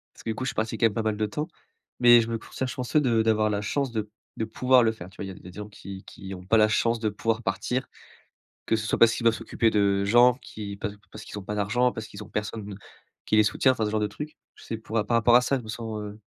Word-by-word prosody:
Parce - - -14
que - - -3
du 110 - -1
coup, 130 - -4
je 135 - 0
suis - - -10
parti 110 0 -2
quand 115 - +4
même 110 - 0
pas 115 - -1
mal 110 -1 0
de 110 0 0
temps, 150 +10 -4 0.5
mais 120 -1 +8
je 115 - -2
me 115 - -2
considère 130 +3 -5
chanceux 130 +5 0
de 120 -5 +2
d'avoir 110 -1 +2
la 100 -1 -1
chance 135 +3 -1
de 105 -2 -3 0.3
de 110 - 0
pouvoir 125 +2 +4
le 110 -1 +3
faire. 95 -4 -10
Tu - - -20
vois? 100 - -5
Il - - -6
y - - -6
a - - -11
il - - -13
y 90 - -9
a - - -9
des 90 - -16
gens 105 0 -6
qui 100 -2 -10
qui 95 0 -9
ont 90 - -10
pas 115 - +4
la 110 0 +5
chance 115 +2 +1
de 110 - +1
pouvoir 115 +2 -1
partir, 110 +7 -2 0.8
que - - +2
ce 110 0 -3
soit - - 0
parce 115 -1 +7
qu'ils 115 - -4
doivent 115 - +5
s'occuper 115 -1 0
de 100 -1 +2
gens 120 +4 +6
qui 105 -5 -8
pa 105 - -3 0.2
parce - - -9
qu'ils - - -8
ont 100 - -9
pas 105 - -4
d'argent, 105 +5 +2
parce 110 -2 -7
qu'ils 105 +1 -9
ont 105 - -14
personne 105 -1 -4 0.5
qui 110 - +1
les 110 - +7
soutient, 130 +5 +3
enfin 110 -4 -1
ce 105 - -2
genre 110 - +1
de 105 - +1
truc. 150 +5 -8 0.2
Tu - - -16
sais, 115 - -4
pou 110 0 -12
par 105 -2 +1
rapport 120 0 +5
à 125 - +7
ça, 135 +2 +1
je 125 - -8
me 110 - -11
sens, 110 -1 -5
heu 105 0 -8
110 Hz, 310 wpm, -26 LUFS, 105-120 Hz, 0.8 s, mais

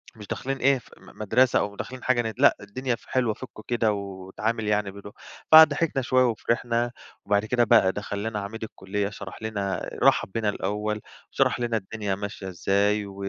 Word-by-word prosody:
مش 105 -2 -11
داخلين 135 +6 -3
إيه 140 +1 +4 0.2
م - - -14
مدرسة 125 +5 +3
أو 100 0 -3
داخلين 130 +4 -7
حاجة 130 -2 +2
ن 110 -1 -3
لأ 140 +2 +5
الدنيا 125 +5 -3
ف - - -21
حلوة 125 -4 +1
فُكوا 110 -1 -11
كده 115 -3 +1
واتعامل 100 +3 -4
يعني 105 -1 +1
بدو 100 +1 -11 0.4
فضحكنا 160 -2 +7
شوية 130 +1 +3
وفِرِحنا، 120 +1 0 0.3
وبعد 100 +1 +2
كده 120 +2 +2
بقى 95 -4 +5
دخلّ 100 0 -5
لنا 110 -1 -2
عميد 105 +3 -6
الكُلّية 100 -1 -3
شرح 100 0 -9
لنا 100 -3 -2
آآ - - -8
رحَّب - - +4
بينا 110 0 0
الأول 105 +2 -2 0.3
وشرح - - +2
لنا 120 -2 0
الدنيا 105 -1 -3
ماشية 100 -1 -6
إزاي 100 +3 +1
و 100 -1 -10
105 Hz, 180 wpm, -25 LUFS, 100-120 Hz, 0.4 s, فضحكنا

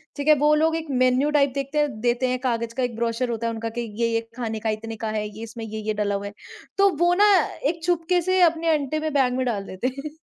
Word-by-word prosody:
ठीक 285 +1 -4
है? 305 - +8
वो 295 +2 +3
लोग 320 +1 +2
एक 325 -1 -4
मेन्यू 255 +2 +2
टाइप 280 -2 +3
देखते 275 +2 -3
हैं 280 -7 0
देते 240 +1 +1
हैं 255 0 -1
कागज 235 -2 -2
का 255 +1 -2
एक 240 -2 -2
ब्रोशर 235 +1 -1
होता 230 0 -2
है 230 - -2
उनका 225 0 -4
कि - - 0 0.2
ये-ये 230 0 +1 0.2
खाने 225 -3 -3
का 220 0 -2
इतने 225 +1 -4
का - - -1
है, 210 -1 -2
ये 215 +2 -9
इसमें 230 0 -7
ये-ये 215 0 -3
डला 205 -1 -1
हुआ 200 - -4
है। 200 - -9 0.4
तो 395 0 +5
वो 345 +1 +3
ना 410 +3 +5 0.4
एक 330 -1 -5
छुपके 350 0 +1
से 370 +2 +1
अपने 330 -1 +3
अंटे 300 +1 -1
पे 315 0 -2
बैग 265 -4 +2
में 260 - 0
डाल 210 -5 -1
देते 190 +7 -3
हैं। 275 +3 -5
255 Hz, 265 wpm, -24 LUFS, 225-305 Hz, 0.4 s, है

